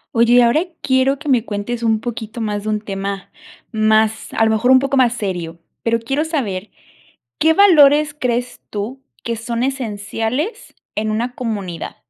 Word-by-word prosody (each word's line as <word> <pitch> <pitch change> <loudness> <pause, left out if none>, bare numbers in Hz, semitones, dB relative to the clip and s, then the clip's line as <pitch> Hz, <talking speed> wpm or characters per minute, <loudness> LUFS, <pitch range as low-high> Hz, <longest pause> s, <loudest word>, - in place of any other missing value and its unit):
Oye, 235 +1 +4
y 245 - +7
ahora 240 +6 +4 0.2
quiero 265 +1 +2
que 300 +2 -10
me 250 -5 +3
cuentes 220 +2 -4
un 225 -2 +2
poquito 225 -1 -6
más, 210 -2 -2
de 215 - -3
un 215 -1 -1
tema 195 -1 -5 0.4
más, 220 0 +2
a 225 - +3
lo 220 - +2
mejor, 220 +3 +1
un 260 - +8
poco 275 +1 -1
más 250 -3 +4
serio. 175 -6 -4 0.2
Pero 230 0 +1
quiero 270 +6 -1
saber, 220 - -3 0.7
¿qué 320 +1 +4
valores 300 -6 +6
crees 245 0 -2
tú, 220 +6 -5 0.2
que 235 - -2
son 230 +1 -3
esenciales 245 - -3 0.2
en 215 +1 -1
una 235 +3 -2
comunidad? 200 -9 -4
230 Hz, 170 wpm, -19 LUFS, 215-260 Hz, 0.7 s, un